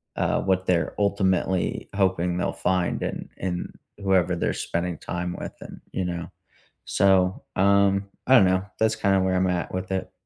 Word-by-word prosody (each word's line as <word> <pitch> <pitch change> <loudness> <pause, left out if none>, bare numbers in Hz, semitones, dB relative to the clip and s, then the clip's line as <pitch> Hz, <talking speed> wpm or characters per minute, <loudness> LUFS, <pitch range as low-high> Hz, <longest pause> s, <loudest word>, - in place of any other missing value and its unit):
uh, - - +1
what 95 -1 +1
they're 85 -2 +1
ultimately 95 -2 0
hoping 90 -3 +1
they'll - - 0
find, 90 -2 0
and - - -4
and 90 -1 -3 0.3
whoever 95 -2 +2
they're - - -1
spending 85 -1 -2
time 90 0 -4
with - - -6
and, - - -10
you 95 - -1
know? 85 -1 -4 0.5
So, 95 -1 +2
um, 100 0 +3 0.2
I 130 - +7
don't 95 - +7
know, 95 +1 +1
that's 110 0 +2
kinda 95 -3 +2
where 95 0 +1
I'm 95 0 +2
at 90 -1 -1
with 95 +1 -4
it. 95 - -2
95 Hz, 170 wpm, -25 LUFS, 90-95 Hz, 0.5 s, I